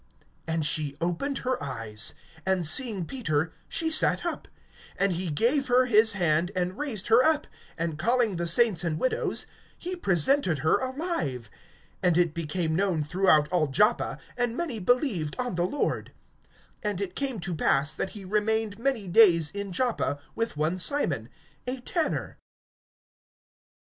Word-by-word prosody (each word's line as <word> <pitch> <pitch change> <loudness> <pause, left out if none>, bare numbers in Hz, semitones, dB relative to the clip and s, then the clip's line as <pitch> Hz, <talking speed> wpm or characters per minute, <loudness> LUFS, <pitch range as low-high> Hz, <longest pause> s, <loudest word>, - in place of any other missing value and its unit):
And 160 -1 -1
she 145 -2 -1
opened 175 +12 -2
her 255 0 -1
eyes; 115 -6 -2 0.3
and 190 -2 0
seeing 205 - +3
Peter, 160 - -2 0.2
she 320 -1 -1
sat 315 - +3
up. - - -4 0.5
(41)And 195 0 +2
he 175 0 -1
gave 245 - +1
her 250 +1 +4
his 220 -2 +5
hand, 175 -1 +1
and 180 0 -1
raised 240 -9 -3
her 230 +2 +6
up; 310 0 +2 0.3
and 165 -2 -3
calling 230 0 +1
the 170 0 -2
saints 205 +1 +5
and 160 -2 -2
widows, 255 - 0 0.3
he 365 +1 -4
presented 190 - +1
her 160 - +3
alive. 260 - -3 0.5
(42)And 175 -2 +2
it 175 -3 +2
became 160 0 -2
known 185 -4 0
throughout 155 -2 +3
all 175 -3 +1
Joppa; 210 - +1 0.2
and 245 -1 -1
many 295 -10 -2
believed 205 - +1
on 250 -3 -2
the 175 0 0
Lord. 290 - -2 0.7
(43)And 205 -3 -2
it 195 -2 -4
came 270 -6 -1
to 180 0 -4
pass, 145 -1 +2
that - - -3
he 195 - -9
remained 215 +1 0
many 235 -5 -1
days 175 -6 +5
in 200 0 -4
Joppa, 225 - -1 0.2
with 230 -8 -3
one 160 +5 0
Simon, 165 - +1 0.4
a 255 +1 -3
tanner. 315 +6 -3
190 Hz, 155 wpm, -27 LUFS, 165-245 Hz, 0.7 s, her